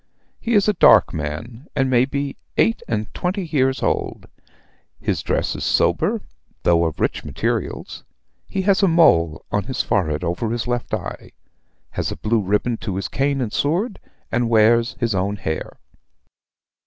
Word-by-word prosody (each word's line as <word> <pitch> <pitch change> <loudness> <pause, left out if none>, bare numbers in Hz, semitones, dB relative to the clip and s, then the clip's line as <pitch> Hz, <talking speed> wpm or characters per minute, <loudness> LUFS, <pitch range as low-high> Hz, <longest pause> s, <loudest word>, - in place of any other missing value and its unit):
He 235 0 0
is 205 0 +4
a 210 - +4
dark 125 - +6
man, 80 - -5
and 135 -2 +2
may 125 -1 +4
be 140 0 -3 0.2
eight 225 - +3
and 110 -2 -3
twenty 185 +1 -2
years 135 -4 +1
old. - - -1 0.7
His - - -1
dress - - -1
is - - -5
sober, - - +2 0.4
though 85 -1 +4
of 80 - -3
rich - - -1
materials. - - -3 0.4
He 195 - -2
has 195 0 +3
a 195 - +5
mole 85 - +4
on 105 -2 0
his 130 - -2
forehead 80 -4 0
over 90 +6 -1
his 120 +1 -2
left 120 0 -2
eye; - - -7 0.6
has - - -2
a - - -5
blue 110 +1 +1
ribbon 105 +4 0
to 100 -4 -4
his 95 - -2
cane 140 0 0
and 110 -4 -3
sword, 185 - 0 0.3
and 120 0 +1
wears 115 +1 +4
his 115 -3 0
own 95 +2 0
hair. 80 -6 -4
120 Hz, 165 wpm, -21 LUFS, 100-145 Hz, 0.7 s, dark